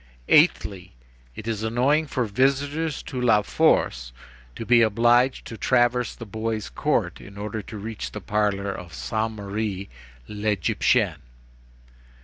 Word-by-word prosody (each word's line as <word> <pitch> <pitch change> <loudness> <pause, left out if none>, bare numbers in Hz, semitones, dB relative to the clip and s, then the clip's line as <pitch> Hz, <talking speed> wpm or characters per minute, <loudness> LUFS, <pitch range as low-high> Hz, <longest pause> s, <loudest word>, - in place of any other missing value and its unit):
"Eighthly: 100 - +3 0.4
it 110 - -8
is 110 -2 -2
annoying 130 +8 +1
for 130 -3 -1
visitors 140 +7 0
to 125 - -5
La 110 -4 +4
Force - - +1 0.4
to 115 - -6
be 120 0 +5
obliged 120 +4 +3
to 115 - -8
traverse 120 -1 +2
the 115 - -9
boys' 110 +1 -3
court - - -1
in 100 0 -12
order 105 +1 -4
to 105 +2 -9
reach 110 +1 -5
the 105 - -6
parlor 100 -1 -1
of 85 -5 -9
Sainte 110 - -2
Marie 100 -1 -4 0.4
l'Égyptienne. 105 - 0
110 Hz, 130 wpm, -24 LUFS, 100-120 Hz, 0.4 s, be